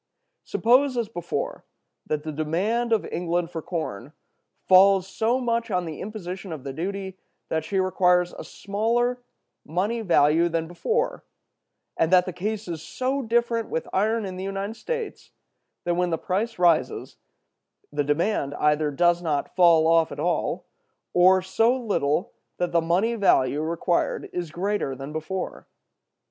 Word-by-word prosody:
Suppose, 255 +2 +3
as 230 -3 -1
before, 175 -6 -4 0.4
that 150 -1 -2
the 155 - -4
demand 185 +11 -1
of 220 -2 +2
England 175 0 -1
for 165 - -4
corn 150 - -5 0.5
falls 190 0 +6
off 195 - -15
so 235 +3 +1
much 235 -2 -1
on 180 -3 0
the 160 -2 -6
imposition 190 -2 -6
of 155 -5 -6
the 135 -1 -5
duty 190 +4 -4 0.3
that 160 0 -1
she 195 - -3
requires 180 -1 +2
a - - -8
smaller 235 +5 -1 0.4
money 200 +9 -1
value 170 -3 +3
than 165 -1 -1
before, 460 - -1 0.8
but 160 - +3
that 180 0 +5
the 185 - -5
case 205 +4 -3
is 165 -3 -5
so 260 - -2
different 235 -1 0
with 160 - -3
iron 215 +3 +1
in 185 -1 -6
the 185 - -5
United 195 +2 -4
States 465 - -5 0.5
that 175 - 0
when 180 +1 +1
the 165 - 0
price 210 +8 -2
rises 175 -3 +1 0.8
the 145 0 +1
demand 145 0 0
either 150 0 +2
does 175 +4 +2
not 150 -4 -2
fall 170 -3 +6
off 165 0 +4
at - - -7
all, - - -1 0.5
or 185 +1 +5
so 225 +7 +2
little 180 - -1 0.2
that 175 0 -1
the 170 - +3
money 180 +8 +1
value 150 - +2
required 170 +2 -1
is 175 -2 -3
greater 180 -4 -2
than 135 +3 -8
before. 160 +4 -5
180 Hz, 155 wpm, -25 LUFS, 165-215 Hz, 0.8 s, falls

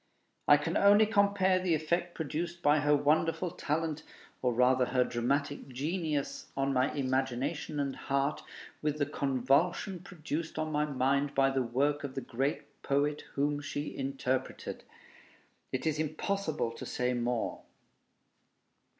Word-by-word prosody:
I 145 - +8
can 155 +4 -1
only 205 +2 +6
compare 200 -3 +3
the 180 -3 +2
effect 170 +3 -1
produced 170 +2 -4
by 150 +1 +5
her 145 0 +4
wonderful 160 +4 +1
talent, 160 -2 -2 0.4
or 125 - +2
rather 125 +1 +4
her 125 0 +2
dramatic 140 +5 -1
genius, 145 +1 -2
on 135 0 +1
my 130 +1 +2
imagination 135 +3 -1
and 140 -1 -1
heart, 140 +1 -1 0.4
with 150 -1 0
the 145 - +1
convulsion 140 - +1
produced 165 -3 -5
on 155 0 -1
my 150 0 +1
mind 140 0 0
by 135 0 +4
the 135 -1 +1
work 140 +5 0
of 140 -1 -5
the 135 - -2
great 135 +3 -3
poet 145 +2 0
whom 145 +1 0
she 145 0 -4
interpreted. 135 -1 -3 0.9
It 130 - -2
is 155 -1 0
impossible 155 - -1
to 115 - -8
say 125 0 0
more. 120 -1 -1
145 Hz, 140 wpm, -31 LUFS, 135-160 Hz, 0.9 s, I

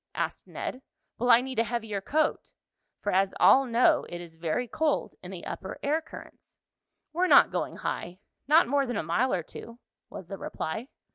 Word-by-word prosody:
asked - - -3
Ned. 255 - -5 0.4
"Will 245 +2 0
I 235 0 +8
need 260 -2 -4
a - - +4
heavier 220 -3 -3
coat?" 305 +9 -1 0.5
for 205 - 0
as 195 +1 +2
all 270 +1 +6
know, 235 +1 +4
it 175 - -6
is 170 -2 -10
very 165 +9 -2
cold 310 +5 -1
in 180 - -9
the 185 -2 -8
upper 190 - -6
air 300 +3 +1
currents. 320 - -14 0.6
"We're 360 +3 +2
not - - +7
going - - -2
high, 175 +1 -4 0.3
not 310 +1 +6
more 280 +1 +1
than 245 -3 -2
a - - -1
mile 175 +12 +1
or 175 - 0
two," 230 +8 -10 0.3
was 185 - -9
the 195 +1 -7
reply. 220 +10 -4
230 Hz, 190 wpm, -28 LUFS, 190-265 Hz, 0.6 s, I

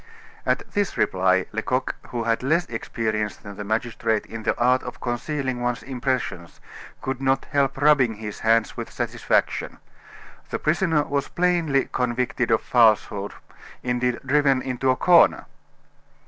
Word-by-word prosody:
At - - 0
this 205 -3 -1
reply 95 0 +2
Lecoq, 125 +4 -1
who 120 -1 -3
had 115 0 0
less 165 +7 +1
experience 110 -2 -3
than 100 -1 -10
the 105 - -6
magistrate 110 +1 -1
in 115 0 -7
the 110 - -1
art 125 +2 +3
of - - -8
concealing 130 +1 -3
one's 120 -1 -2
impressions, 130 -9 -3 0.4
could 130 0 -3
not 135 0 +1
help 140 -2 +1
rubbing 140 -6 +4
his 105 0 -7
hands 115 0 +2
with - - -6
satisfaction. - - -1 0.7
The - - -2
prisoner 160 -1 +1
was 140 -1 -2
plainly 170 -6 +1
convicted 125 0 -1
of 110 - +3
falsehood, 110 -4 +2 0.5
indeed 125 0 0
driven 135 -1 +3
into 130 0 -1
a 130 - +4
corner. 175 +5 +5
125 Hz, 140 wpm, -24 LUFS, 110-135 Hz, 0.7 s, corner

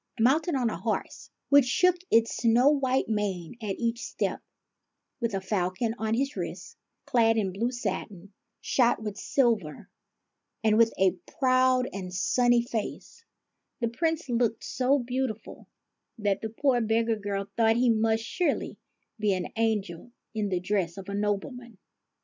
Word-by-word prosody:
Mounted 290 +8 +3
on 245 -4 +1
a - - -5
horse, - - -3 0.2
which 285 -2 +6
shook 360 +8 +3
its 230 0 +3
snow 240 +3 +4
white 270 -3 +1
mane 200 -4 -2
at 205 -3 -3
each 235 0 -1
step, - - -2 0.8
with 230 -4 -1
a - - 0
falcon 190 +3 -1
on 220 0 0
his 275 +4 -1
wrist, - - -6 0.3
clad 225 -3 +3
in 195 -4 0
blue 230 +5 0
satin, 200 -4 -5 0.3
shot 245 -2 +2
with 210 -2 -4
silver, 225 - 0 0.7
and 215 -1 +4
with 230 -1 +5
a 190 -1 +4 0.3
proud 255 -1 +3
and 185 -2 -6
sunny 240 +4 +3
face, 235 - -5 0.6
the 235 - 0
Prince 320 +5 -1
looked 235 -2 0
so 260 +3 +1
beautiful 245 -3 -4 0.5
that 205 -3 0
the 220 - -3
poor 245 +2 +1
beggar 225 +1 +1
girl 200 -1 -3
thought 225 -1 +3
he 240 0 +3
must 225 0 +1
surely 345 +8 -2 0.4
be 210 -2 +2
an 185 -1 -3
angel 220 -2 -1 0.2
in 215 -2 -1
the 180 -2 0
dress 180 -2 -1
of 195 0 -8
a - - -4
nobleman. 210 +3 -3
225 Hz, 150 wpm, -27 LUFS, 205-250 Hz, 0.8 s, which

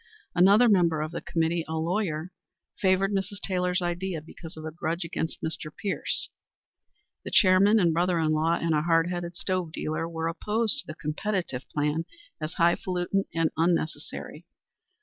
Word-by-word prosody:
Another 200 +7 +6
member 170 -7 +3
of 155 +1 -3
the 170 - -5
committee, 165 0 0
a 160 - -3
lawyer, 170 -1 -1 0.5
favored 190 +1 +3
Mrs. 200 0 -2
Taylor's 180 -1 0
idea 175 0 -2
because 160 +1 -11
of 155 - -7
a 160 - -4
grudge 170 +2 -2
against 165 -1 -4
Mr. 160 -1 -3
Pierce. 200 +4 -1 0.9
The - - -5
chairman 200 +2 +5
and 170 -4 +3
brother 175 +1 +2
in 160 -1 +1
law, 160 +2 +2
and 165 -1 0
a 150 - +2
hard 165 +1 +2
headed 175 -1 -4
stove 185 -3 -1
dealer, 155 +1 -3
were 165 -1 -2
opposed 215 +9 0
to - - -7
the 155 - -6
competitive 160 -3 -3
plan 150 +2 -1 0.4
as 155 +2 -3
highfalutin 180 +3 +1
and 165 -1 +2
unnecessary. 165 -1 -1
170 Hz, 160 wpm, -27 LUFS, 160-185 Hz, 0.9 s, Another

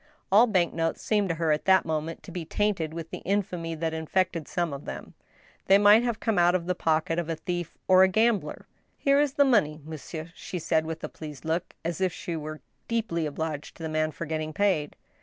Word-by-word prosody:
All 220 +5 +7
bank 185 -6 +2
notes 165 0 -1
seemed 205 -3 +1
to 165 - 0
her, 165 -1 +1
at 150 - 0
that 190 0 +5
moment, 160 +1 -3
to - - -10
be 175 -1 -4
tainted 190 -3 -1
with 165 0 -7
the - - -5
infamy 180 -4 -2
that 160 0 -2
infected 165 0 -1
some 175 -5 -1
of 140 - -7
them - - -7 0.3
— - - -30
they 195 - +7
might 205 +2 +7
have 235 -2 -1
come 220 -5 +1
out 175 +1 +4
of 175 -2 -1
the 180 - 0
pocket 165 -1 0
of 170 -1 -3
a 165 - 0
thief 175 +1 -4
or 185 0 +7
a 190 - +8
gambler! 220 +2 +1 0.3
Here 280 0 +3
is 290 -2 +2
the 285 - +4
money, 165 - +2
monsieur," 160 +1 -7
she 180 - -6
said, 160 -1 0
with 160 0 -5
a - - -2
pleased 150 -2 -9
look, 165 +2 -2
as 170 +2 -2
if 185 -1 +2
she 170 0 -5
were 155 0 -6 0.3
deeply 210 -9 -1
obliged 150 0 -5
to 165 - -9
the 160 - -2
man 155 0 +1
for 170 - -6
getting 155 0 -3
paid. 180 -6 +1
170 Hz, 230 wpm, -27 LUFS, 160-190 Hz, 0.3 s, a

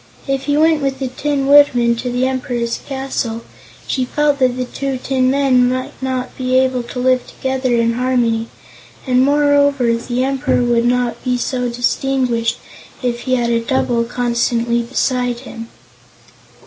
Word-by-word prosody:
If 275 0 -1
he 290 0 +1
went 315 0 +3
with 270 -1 -1
the 265 -1 -3
Tin 280 +1 -2
Woodman 265 -4 +5
to 245 +1 -3
the 250 +1 0
Emperor's 245 -3 -2
castle, 265 -4 -3 0.4
she 260 - -1
felt 290 +2 0
that 255 -1 +2
the 255 - -2
two 270 +1 -4
tin 255 0 0
men 260 -2 +3
might 255 0 -3
not 260 -1 -3
be 255 0 +1
able 260 -1 +2
to 240 +1 -9
live 255 0 +1
together 260 -2 -1
in 230 0 +2
harmony, 235 -2 0 0.6
and 255 -1 +3
moreover 285 -3 +3
the 240 +2 -2
Emperor 265 -2 0
would 240 -1 +2
not 245 0 0
be 250 -1 0
so 250 0 -2
distinguished 245 -1 0 0.5
if 240 -1 -1
he 255 - +3
had 240 -1 0
a 230 - +2
double 240 -2 0
constantly 235 0 0
beside 245 0 -1
him. 230 -3 -9
255 Hz, 160 wpm, -17 LUFS, 240-265 Hz, 0.6 s, Woodman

